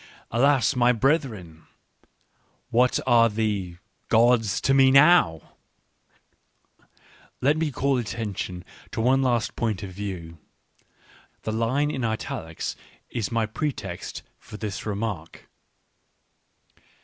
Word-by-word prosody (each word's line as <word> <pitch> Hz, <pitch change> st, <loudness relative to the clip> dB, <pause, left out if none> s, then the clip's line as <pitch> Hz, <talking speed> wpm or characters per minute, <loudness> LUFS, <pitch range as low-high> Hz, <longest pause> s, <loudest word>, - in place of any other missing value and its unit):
Alas, 130 Hz, +1 st, +3 dB
my 125 Hz, 0 st, +4 dB
brethren! 115 Hz, -, -1 dB, 1.0 s
What 125 Hz, +2 st, +3 dB
are 120 Hz, -2 st, +5 dB
the 105 Hz, -5 st, -2 dB, 0.2 s
— -, -, -45 dB
gods 115 Hz, -2 st, +3 dB
to 135 Hz, -, +2 dB
me 135 Hz, -1 st, +6 dB
now? 135 Hz, -, +4 dB, 1.2 s
" -, -, -30 dB
Let 145 Hz, +3 st, +4 dB
me 160 Hz, -1 st, 0 dB
call 135 Hz, -1 st, 0 dB
attention 100 Hz, -6 st, -5 dB, 0.3 s
to 115 Hz, -, -3 dB
one 130 Hz, +4 st, +3 dB
last 120 Hz, -4 st, 0 dB
point 110 Hz, -4 st, -2 dB
of 95 Hz, -, -6 dB
view. 90 Hz, -4 st, -7 dB, 1.0 s
The 110 Hz, -, -2 dB
line 130 Hz, +7 st, 0 dB
in 130 Hz, -, -4 dB
italics 110 Hz, -7 st, -4 dB, 0.4 s
is 115 Hz, -3 st, -3 dB
my 115 Hz, -1 st, +1 dB
pretext 140 Hz, +6 st, -5 dB, 0.2 s
for 105 Hz, -, -11 dB
this 105 Hz, 0 st, -5 dB
remark. 100 Hz, -6 st, -5 dB
115 Hz, 115 wpm, -25 LUFS, 100-130 Hz, 1.2 s, me